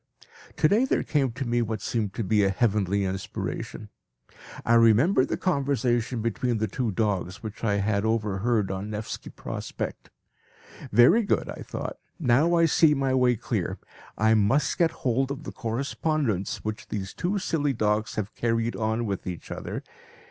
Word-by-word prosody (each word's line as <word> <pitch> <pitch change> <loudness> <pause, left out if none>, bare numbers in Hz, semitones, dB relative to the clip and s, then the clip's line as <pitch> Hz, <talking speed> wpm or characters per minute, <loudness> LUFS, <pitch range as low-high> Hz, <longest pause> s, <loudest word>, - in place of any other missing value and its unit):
To 155 - +5
day 220 +9 +3
there - - +1
came 140 -5 +1
to 130 +2 -4
me 120 0 +1
what 110 -2 -2
seemed 105 -4 -2
a 105 -2 +2
heavenly 100 -2 +1
inspiration. 95 +2 -4 0.8
I 115 - +3
remembered 115 - +5
the - - -2
conversation 130 - 0
between 115 +1 0
the 110 - 0
two 120 +4 -2
dogs 100 -1 -1
which 110 0 -7
I 105 -3 +2
had 100 0 +1
overheard 110 -1 0
on 95 +2 -4
the 105 - -3
Nevski 105 - -6
Prospect. - - -6 0.8
"Very 120 - +6
good," 200 - 0
I - - -7
thought; - - -6 0.2
"now 155 +2 +3
I 170 0 +5
see 160 -1 +4
my 135 -1 0
way 125 -1 +4
clear. - - -2 0.4
I 110 +1 +4
must 115 +7 +2
get 170 -2 +5 0.2
hold 130 +2 +2
of 140 +2 -5
the - - -6
correspondence 130 - -2
which 110 0 -5
these 100 -2 -4
two 190 +4 -1
silly 150 -7 0
dogs 105 -2 0
have 105 0 -3
carried 115 0 0
on 110 +1 -1
with 100 -3 -4
each 90 -2 -6
other. - - -5
115 Hz, 165 wpm, -26 LUFS, 105-135 Hz, 0.8 s, Very